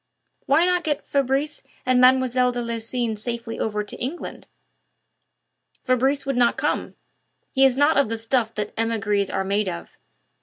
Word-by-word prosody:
"Why 310 +5 +4
not 360 -1 +1
get 295 -2 -2
Fabrice 275 +2 0 0.2
and 255 -1 +3
Mlle. 255 -1 +4
de 245 - -4
Lucines 230 -1 -2
safely 235 -1 -5
over 210 -1 -1
to 205 - -7
England?" 275 +8 -5 1.4
"Fabrice 265 +3 +1
would 275 -1 -1
not 240 -1 +3
come. - - -2 0.6
He 270 0 +4
is 260 -1 +3
not 290 +2 +4
of 280 -5 +3
the 225 - -2
stuff 225 0 0
that 210 0 -4
emigres 210 -3 0
are 195 - -1
made 200 +1 0
of. 170 -1 -8
245 Hz, 155 wpm, -23 LUFS, 225-270 Hz, 1.4 s, Why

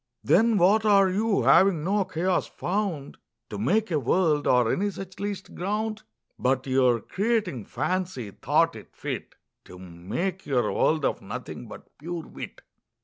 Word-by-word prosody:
Then 225 +3 +4
what 200 +4 +4
are 200 -3 +5
You, 200 - +1
having 165 +5 +5
no 195 +3 +1
Chaos 180 0 0
found 180 -7 -3 0.3
To 105 - -5
make 200 - +1
a 155 - +2
World, 150 +2 +1
or 125 -2 +3
any 205 +2 0
such 195 -1 -9
least 200 -2 -5
ground? 215 +3 -2 0.4
But 130 0 +1
your 130 -3 +3
Creating 200 - -1
Fancy, 150 - -3
thought - - +1
it - - -13
fit - - -5 0.3
To 90 - -12
make 95 - -4
your 130 -4 +1
World 155 -3 +2
of - - -1
Nothing, - - -7
but - - -13
pure 165 +2 -5
Wit. - - -9
180 Hz, 150 wpm, -26 LUFS, 135-200 Hz, 0.4 s, are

